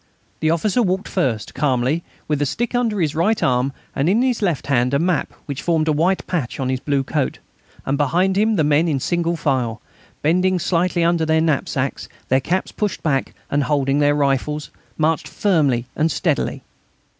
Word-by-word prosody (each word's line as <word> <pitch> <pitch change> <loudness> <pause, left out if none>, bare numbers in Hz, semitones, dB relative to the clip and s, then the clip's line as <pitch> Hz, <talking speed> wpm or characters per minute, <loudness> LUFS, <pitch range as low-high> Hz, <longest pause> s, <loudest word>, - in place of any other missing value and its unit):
The 155 - +1
officer 190 +8 +1
walked 190 -1 0
first, 125 - -1
calmly, 135 +3 0 0.2
with 150 -1 0
a - - +3
stick 240 - -2
under 235 -4 0
his 155 -4 +1
right 195 +8 +2
arm, 125 +1 +2 0.2
and 140 +5 +1
in 220 +6 +3
his 250 -3 0
left 175 -8 0
hand 125 -1 +2
a - - +4
map 175 +1 0
which 140 -2 -5
formed 160 -2 +1
a - - +3
white 175 +6 +1
patch 150 -9 -3
on 130 -1 -1
his 130 -1 0
blue 140 0 0
coat, 140 0 -1 0.5
and 140 +2 -1
behind 180 +7 +2
him 215 +2 +2
the 160 - +2
men, 150 +3 +3
in 145 -4 0
single 170 +3 0
file, 120 -7 -1 0.4
bending 180 +4 +2
slightly 175 0 +1
under 170 -1 +2
their 160 0 +2
knapsacks, 140 -4 -1 0.2
their 130 +1 +3
caps 185 +7 -1
pushed 210 -3 -3
back 135 -4 0 0.2
and 145 -1 +1
holding 140 0 +1
their 145 0 +3
rifles, 145 +1 0 0.3
marched 160 0 +1
firmly 145 - +1
and 160 +1 +1
steadily. - - -1
155 Hz, 185 wpm, -20 LUFS, 140-180 Hz, 0.5 s, a